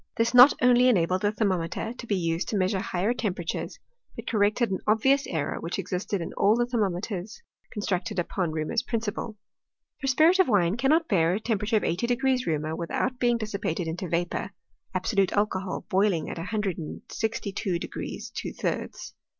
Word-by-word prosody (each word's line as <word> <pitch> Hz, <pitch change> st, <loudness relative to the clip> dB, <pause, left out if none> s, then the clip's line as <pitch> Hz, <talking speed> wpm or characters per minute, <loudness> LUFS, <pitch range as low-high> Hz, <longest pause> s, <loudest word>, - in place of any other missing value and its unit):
This 230 Hz, +1 st, +1 dB
not 250 Hz, +3 st, +9 dB
only 250 Hz, 0 st, +6 dB
en 235 Hz, -, +4 dB
abled 180 Hz, +3 st, +1 dB
the 205 Hz, -1 st, +2 dB
thermometer 195 Hz, 0 st, -1 dB
to 240 Hz, -1 st, -10 dB
be 205 Hz, -, +1 dB
used 170 Hz, -1 st, -1 dB
to 210 Hz, -, 0 dB
measure 190 Hz, +1 st, +1 dB
higher 185 Hz, +5 st, 0 dB
temperatures, 180 Hz, -8 st, -3 dB, 0.4 s
but -, -, -7 dB
corrected 215 Hz, +1 st, +1 dB
an 190 Hz, -, -1 dB
obvious 265 Hz, +6 st, +3 dB
error 155 Hz, -4 st, -2 dB
which 170 Hz, +2 st, -4 dB
existed 195 Hz, 0 st, -2 dB
in 165 Hz, -, -5 dB
all 205 Hz, +2 st, +3 dB
the 240 Hz, 0 st, +2 dB
thermometers 205 Hz, -, -2 dB, 0.3 s
constructed 205 Hz, 0 st, -2 dB
upon 175 Hz, -1 st, -1 dB
Reaumur's 155 Hz, +8 st, -1 dB
principle: 225 Hz, -1 st, -3 dB, 0.6 s
for 270 Hz, -, -3 dB
spirit 315 Hz, +8 st, +4 dB
of 375 Hz, -, +5 dB
wine 195 Hz, -4 st, +3 dB
cannot 305 Hz, +7 st, +2 dB
bear 175 Hz, -4 st, +2 dB
a -, -, -1 dB
temperature 220 Hz, 0 st, 0 dB
of -, -, -1 dB
eighty 180 Hz, +8 st, 0 dB
degrees 255 Hz, +1 st, +1 dB
Reaumur 155 Hz, 0 st, -1 dB
without 245 Hz, +9 st, -2 dB
being 240 Hz, -1 st, +3 dB
dissipated 200 Hz, -6 st, -3 dB
into 170 Hz, +2 st, -4 dB
vapour 175 Hz, +1 st, -1 dB, 0.2 s
— -, -, -43 dB
absolute 195 Hz, -4 st, +1 dB
alcohol 195 Hz, -2 st, -1 dB
boiling 190 Hz, -4 st, +1 dB
at -, -, -6 dB
a 165 Hz, -, -4 dB
hundred 210 Hz, -4 st, -2 dB
and 155 Hz, -, -7 dB
sixty 220 Hz, -2 st, -2 dB
two 190 Hz, -3 st, -1 dB
degrees -, -, -6 dB
two -, -, -5 dB
thirds. -, -, -4 dB
205 Hz, 185 wpm, -27 LUFS, 180-235 Hz, 0.6 s, not